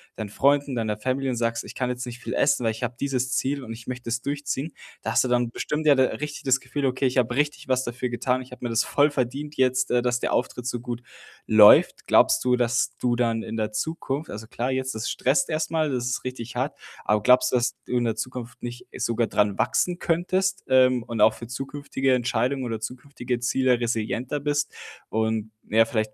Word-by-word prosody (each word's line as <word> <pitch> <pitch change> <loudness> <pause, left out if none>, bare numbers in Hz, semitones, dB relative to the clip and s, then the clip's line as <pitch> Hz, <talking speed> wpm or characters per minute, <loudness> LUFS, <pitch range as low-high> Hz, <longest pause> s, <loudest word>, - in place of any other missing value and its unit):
deinen 110 -2 -5
Freunden, 140 +4 +2
deiner 110 -3 -1
Family 130 +4 -1
und 130 - 0
sagst: 115 0 -1
„Ich - - -10
kann 125 -1 -2
jetzt 125 0 -3
nicht 120 0 -8
viel - - -5
essen, 140 -3 +2
weil 115 - +2
ich 110 +3 -7
habe 125 0 -2
dieses 130 -2 -1
Ziel 140 +1 -1
und 115 -2 -6
ich 115 0 -12
möchte 125 -1 -5
das 120 0 -1
durchziehen.“ 145 +2 -3 0.3
Da - - -2
hast - - +4
du - - -1
dann 120 -1 +1
bestimmt 150 +5 -3
ja 145 - +7
d 130 - +4
richtig 145 +5 -3
das 135 0 +3
Gefühl: 135 +2 -3
„Okay, 130 +1 +1
ich 130 - -2
habe 120 -1 +2
richtig 145 0 -1
was 130 0 +1
dafür 120 +1 -3
getan. 125 +1 -1
Ich 125 - -18
habe 125 - -11
mir 120 - -2
das 115 0 +2
voll 145 +1 +3
verdient 145 +2 -3
jetzt, 130 0 +2
äh, 120 -1 +2
dass 125 0 +1
der - - -2
Auftritt 125 0 -1
so 120 -1 -2
gut 120 -1 -5 0.5
läuft.“ 105 -1 +7
Glaubst - - +4
du, 125 0 +4
dass 120 0 +1
du 120 -1 +1
dann 115 -2 +1
in 115 - -5
der 110 -1 -1
Zukunft 140 +4 -3
also, 110 +1 -7
klar, 125 +3 -2
jetzt 130 -1 -2
das 110 +2 -3
stresst 135 +4 +1
erst 155 0 -1
mal, 160 -2 +1
das 125 -2 -1
ist 130 - -2
richtig 125 -2 -6
hart, - - -2 0.2
aber 105 0 +2
glaubst 125 +4 +5
du, 125 - +3
dass 120 0 0
du 125 - -1
in 120 - +1
der 115 -2 0
Zukunft 120 +1 -6
nicht 120 0 -6
sogar 115 0 0
dran 105 -2 +1
wachsen 180 -1 +1
könntest, 185 +3 0
ähm, 130 -2 +4
und 115 -1 -5
auch 110 +1 +6
für 115 +1 -9
zukünftige 135 +1 -2
Entscheidungen 125 +2 0
oder 115 -3 -3
zukünftige 125 +1 -5
Ziele 125 0 +2
resilienter 120 +4 -2
bist 145 0 -1 0.4
und, 110 0 -1 0.2
ja, 110 +1 +5
vielleicht 110 -4 -2
125 Hz, 225 wpm, -25 LUFS, 115-135 Hz, 0.5 s, ja